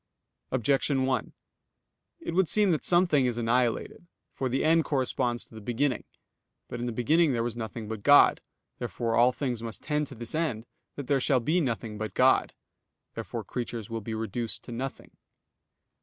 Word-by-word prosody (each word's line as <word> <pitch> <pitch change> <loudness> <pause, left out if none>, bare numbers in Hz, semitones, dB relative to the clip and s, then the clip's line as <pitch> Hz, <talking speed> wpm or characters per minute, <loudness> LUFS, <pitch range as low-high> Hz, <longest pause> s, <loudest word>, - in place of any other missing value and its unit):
Objection 135 +2 +1
1: 130 -1 -1 0.9
It - - -4
would 185 -1 +2
seem 210 -3 +4
that 155 - 0
something 170 -7 +3
is 120 -1 -2
annihilated. 120 +7 0 0.3
For 130 -1 -2
the 130 +4 0
end 165 +1 +4
corresponds 130 -4 -1
to - - -21
the 110 - -9
beginning. 125 +2 -1 0.6
But 120 - -6
in 120 - -2
the - - -1
beginning 145 +6 +3
there 115 -1 0
was 120 -1 -3
nothing 110 -1 -6
but 110 -1 -5
God. 145 +6 +6 0.4
Therefore 115 -1 -2
all 120 +2 +5
things 125 -3 -3
must 115 -1 -7
tend 150 -1 -1
to 135 - -9
this 115 0 -6
end, 150 -9 -1 0.3
that 140 - -6
there 135 +1 +1
shall 130 0 +3
be 160 +9 +1
nothing 115 -5 -3
but 110 -4 -4
God. - - +3 0.6
Therefore - - -5
creatures 115 -3 -5
will 115 -1 -3
be 110 +2 -5
reduced 115 +1 -3
to - - -10
nothing. 130 +3 -6
125 Hz, 175 wpm, -28 LUFS, 115-145 Hz, 0.9 s, God